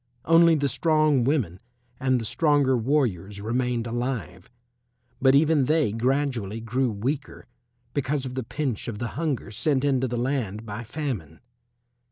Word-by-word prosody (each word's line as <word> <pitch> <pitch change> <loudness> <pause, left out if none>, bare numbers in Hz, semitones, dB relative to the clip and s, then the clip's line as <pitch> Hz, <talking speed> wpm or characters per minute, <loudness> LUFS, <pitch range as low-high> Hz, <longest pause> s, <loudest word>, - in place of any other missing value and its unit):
Only 165 0 +6
the 145 -2 +1
strong 155 -2 +2
women 125 - 0 0.4
and 130 -1 +2
the 115 - -4
stronger 145 0 +2
warriors 110 - 0
remained 120 +2 -1
alive, 120 - -4 0.7
but 135 0 +5
even 150 -1 +4
they 155 -5 +2
gradually 120 -3 -1
grew 120 +3 0
weaker 130 +7 -4 0.5
because 140 0 -1
of 125 - -5
the 130 - -2
pinch 130 -2 -3
of 115 -3 -4
the 120 +1 -3
hunger 145 -9 -3
sent 135 +5 0
into 130 -2 +2
the 120 0 -3
land 120 -4 -2
by 105 +2 -6
famine. 115 - -5
130 Hz, 145 wpm, -25 LUFS, 115-145 Hz, 0.7 s, Only